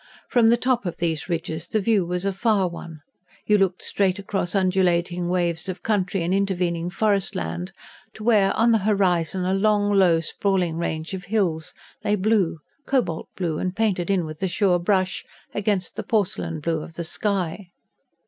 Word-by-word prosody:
From 235 -3 +4
the 235 - +5
top 245 -5 0
of 175 - -4
these 165 -1 -2
ridges 165 -1 -3
the 215 - 0
view 205 -1 +2
was 180 +2 -2
a 195 - 0
far 200 -1 +2
one: 170 -2 -9 0.4
you 210 -1 +4
looked 190 -2 +1
straight 190 -2 +1
across 195 -2 -2
undulating 180 -2 +1
waves 175 -1 0
of 185 - -6
country 195 -4 0
and 175 +2 0
intervening 180 -3 0
forest 200 0 0
land, 85 +1 -4 0.4
to 215 - -9
where, 210 -4 +4
on 230 +1 +4
the 225 - +4
horizon, 185 -3 +1
a 185 - +1
long, 205 +1 +2
low 180 -4 +5
sprawling 180 0 0
range 160 0 -3
of 185 -1 -5
hills 180 -6 -1 0.3
lay 210 - +2
blue 200 -4 +1 0.3
cobalt 245 -12 0
blue, 165 -4 -1
and 185 0 -2
painted 200 -5 0
in 190 -4 +2
with 155 +1 -8
a 190 - +1
sure 180 0 +2
brush 185 +1 0 0.3
against 200 -3 -1
the - - -3
porcelain 200 -8 -1
blue 160 0 -1
of 165 - -10
the 170 - -3
sky. 190 +1 -2
185 Hz, 175 wpm, -24 LUFS, 170-205 Hz, 0.4 s, the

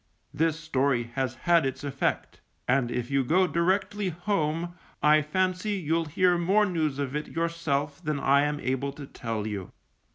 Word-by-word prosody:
This 160 0 +1
story 135 -6 0
has 130 -3 -1
had 170 +5 +3
its 135 0 -3
effect, 140 -1 -2 0.3
and 125 -1 +2
if 120 +1 -3
you 135 -1 +2
go 180 +9 +3
directly 190 +3 0
home, 175 -1 -1 0.3
I 150 +1 +6
fancy 185 +6 0
you'll 165 -3 0
hear 175 +3 +2
more 195 +5 +3
news 160 -7 -1
of 140 -1 -3
it 150 - -2
yourself 165 -2 -2
than 150 -2 -1
I 140 +1 +4
am 150 0 0
able 135 +1 -2
to 145 - -8
tell 115 -5 -4
you. 100 -4 -5
150 Hz, 165 wpm, -27 LUFS, 135-175 Hz, 0.3 s, I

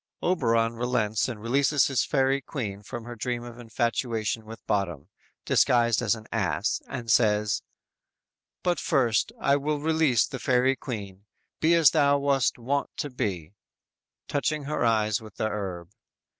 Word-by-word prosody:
"_ - - 0
Oberon 115 -10 +2
relents 115 -3 0
and 115 -4 -6
releases 135 +5 +2
his 135 -3 +1
Fairy 135 0 +1
Queen 105 -9 -5
from 120 +3 -7
her 120 +1 -8
dream 120 +1 -3
of 120 0 -10
infatuation 115 -1 -2
with 115 +1 -11
Bottom 85 -6 -2 0.4
disguised 120 -2 +3
as 115 -2 +2
an 110 -1 -11
ass, - - 0
and 115 -3 -4
says: 105 -1 +3 1.0
"But 175 -1 +1
first, 120 - +1
I 140 0 +3
will 150 +1 -1
release 155 -5 +2
the - - -7
fairy 130 +1 +2
queen, 100 -6 -7 0.3
Be 165 +2 +4
as 165 -4 +6
thou 145 -2 +4
wast 140 -2 +1
wont 135 +4 -1
to 145 - -3
be; 100 -9 -3 0.7
(Touching 150 +1 -1
her 150 0 -2
eyes 110 -1 +2
with 110 -2 -12
the 110 - -1
herb.) 95 -4 -5
120 Hz, 155 wpm, -26 LUFS, 110-140 Hz, 1.0 s, as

